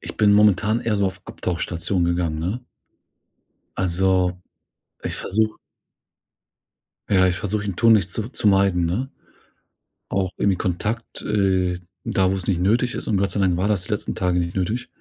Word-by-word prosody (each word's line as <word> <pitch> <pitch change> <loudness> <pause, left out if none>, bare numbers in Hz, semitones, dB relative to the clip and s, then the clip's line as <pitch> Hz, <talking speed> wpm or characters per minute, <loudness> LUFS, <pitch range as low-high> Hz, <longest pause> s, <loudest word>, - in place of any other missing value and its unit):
Ich - - -8
bin 105 -1 +4
momentan 105 +2 +4
eher 110 -3 0
so 100 -1 +2
auf 95 - -5
Abtauchstation 85 +1 -2
gegangen, 85 -2 0
ne? 95 +10 -2 1.2
Also, 95 0 +2 0.7
ich - - -3
versuche 110 +2 -1 1.5
ja, 95 -2 +4
ich 90 - 0
versuche 105 0 -2
ich 105 - -4
ihn 95 - -3
tunlich 110 -5 +4
zu 110 +4 -3
zu 105 - +1
meiden, 95 -3 +3
ne? 105 +11 -1 1.0
Auch 95 -1 0
irgendwie 95 -2 +2
Kontakt 105 +5 -3
äh, 95 -3 +1 0.3
da 95 -1 +1
wo's 95 -2 -2
nicht 90 -3 0
nötig 115 +6 +2
ist - - -5
und 105 - +2
Gott 100 +1 +1
sei 100 - -2
Dank 90 -2 +2
war 95 +3 0
das 105 -4 +1
die - - -7
letzten 105 - -2
Tage 90 -1 0
nicht 85 0 -2
nötig 105 +7 -2
95 Hz, 170 wpm, -22 LUFS, 90-105 Hz, 1.5 s, bin